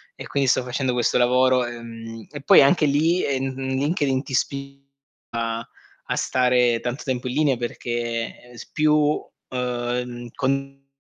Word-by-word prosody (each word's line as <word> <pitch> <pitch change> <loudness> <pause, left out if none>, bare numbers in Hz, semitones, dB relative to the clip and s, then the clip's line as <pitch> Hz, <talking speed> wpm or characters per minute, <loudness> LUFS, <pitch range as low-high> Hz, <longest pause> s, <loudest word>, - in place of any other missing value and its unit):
e - - -8
quindi 140 -1 0
sto 130 - +3
facendo 125 +1 -1
questo 120 -1 +1
lavoro. 125 +1 +3
Ehm, 115 -2 -8
e 145 -2 -7
poi - - +8
anche 150 +3 +4
li 160 +5 +2
ehm, 135 -1 -1
LinkedIn 135 +1 0
ti 135 - -9
spinge 140 +1 -3 0.4
a 115 0 -3 0.4
a - - +2
stare 125 -2 +2
tanto 125 +3 -4
tempo 130 -1 -2
in 125 - -3
linea 145 -4 +3
perché 120 0 -4
s - - -10
più, 150 -1 +2 0.3
ehm, 125 -1 -3
con 135 0 -2
130 Hz, 145 wpm, -23 LUFS, 120-140 Hz, 0.4 s, poi